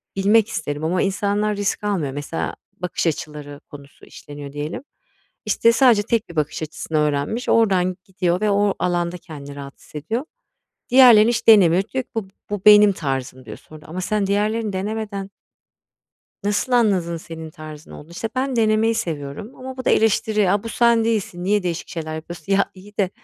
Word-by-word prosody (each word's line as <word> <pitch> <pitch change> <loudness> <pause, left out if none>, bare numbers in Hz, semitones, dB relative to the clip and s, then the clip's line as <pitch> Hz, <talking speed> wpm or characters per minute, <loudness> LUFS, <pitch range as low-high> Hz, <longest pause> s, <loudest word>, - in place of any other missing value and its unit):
bilmek 205 +3 +3
isterim 150 -9 -4
ama 180 +3 0
insanlar 205 +2 0
risk 205 0 -2
almıyor. 180 -10 -1
Mesela 145 +3 -4 0.3
bakış 180 -1 -2
açıları 150 -2 -5
konusu 140 -1 -13
işleniyor 145 -1 -10
diyelim. 150 - -5 0.6
İşte, 230 - +3
sadece 235 -5 +4
tek 225 -3 -1
bir 170 - -11
bakış 150 +1 -1
açısını 155 +1 -4
öğrenmiş. 150 +10 -1
Oradan 185 -5 +2
gidiyor 180 -1 -1
ve 210 -1 +2
o 200 0 +2
alanda 175 0 -1
kendini 145 -4 -10
rahat 140 -1 -9
hissediyor. 220 - -5 0.7
Diğerlerini 240 -4 +7
hiç 235 -1 -2
denemiyor. 190 -5 +6
Diyor 260 - -1
ki - - -42
bu 220 -4 -3 0.2
bu 205 -2 -2
benim 210 -1 +8
tarzım, 135 -4 -4
diyor - - -8
sonra 155 -1 -15
ama 180 +4 -5
sen 205 +1 0
diğerlerini 210 +1 0
denemeden 200 0 -4 1.1
nasıl 205 +5 -1
anladın 190 -9 +2
senin 160 -1 -9
tarzın 155 0 -11
olduğunu? 155 +3 -12
İşte 220 +6 -4
ben 260 0 -1
denemeyi 225 0 +2
seviyorum 165 - -5
ama 260 0 -8
bu 255 - -6
da - - +3
eleştiri, 215 -2 +2
"A, 200 0 +1
bu 230 - -5
sen 235 0 +3
değilsin. 200 -6 -2
Niye 205 +1 +1
değişik 175 -2 -3
şeyler 160 -2 -5
yapıyorsun?" 170 +3 -5
Ya, 195 0 +2
iyi 205 +2 -16
de, 195 -3 +1
195 Hz, 170 wpm, -21 LUFS, 160-215 Hz, 1.1 s, benim